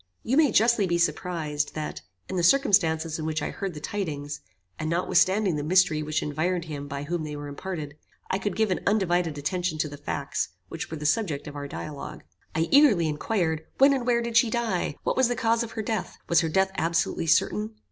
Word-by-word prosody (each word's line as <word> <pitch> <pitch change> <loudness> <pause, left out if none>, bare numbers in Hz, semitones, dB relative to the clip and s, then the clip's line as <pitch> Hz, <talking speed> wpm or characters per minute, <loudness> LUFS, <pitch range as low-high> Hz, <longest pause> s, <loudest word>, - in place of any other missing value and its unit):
You 250 - 0
may 295 -4 +5
justly 220 -1 +4
be 170 -1 +1
surprised, 160 -4 -1
that, 150 - -4 0.3
in 190 - -4
the 180 - +1
circumstances 170 - +3
in 155 - -3
which 155 -1 -1
I - - -2
heard 195 -4 -5
the - - -6
tidings, 150 -5 -4 0.4
and 155 - -2
notwithstanding 180 +1 +2
the 145 - -2
mystery 170 -1 +3
which 155 0 -1
environed 165 +4 -1
him 145 -3 -6
by 140 0 -5
whom 170 +2 -2
they 150 -1 -5
were 145 0 -6
imparted, 150 0 -6 0.3
I 190 - -1
could 205 -2 -2
give 220 -3 +1
an 185 - +1
undivided 175 -6 +1
attention 175 +2 -2
to 155 - 0
the 145 -1 -9
facts, 140 -1 -3 0.2
which 165 - -5
were 160 - -5
the 150 - -6
subject 150 -3 0
of 145 - -8
our 145 0 -5
dialogue. 145 0 -7 0.3
I 160 - +1
eagerly 260 - +6
inquired, 160 0 -1
when 275 +1 +6
and 255 -3 -2
where 235 -1 +2
did 235 -1 0
she 230 0 +5
die? 220 -10 -1
What - - 0
was 260 -2 +4
the 245 - -1
cause 230 -1 +1
of 230 -1 -4
her 220 - -3
death? 215 -3 -3
Was 170 - +4
her 165 - -1
death 190 +4 +2
absolutely 165 0 0
certain? 110 -8 +2
170 Hz, 215 wpm, -26 LUFS, 150-205 Hz, 0.4 s, eagerly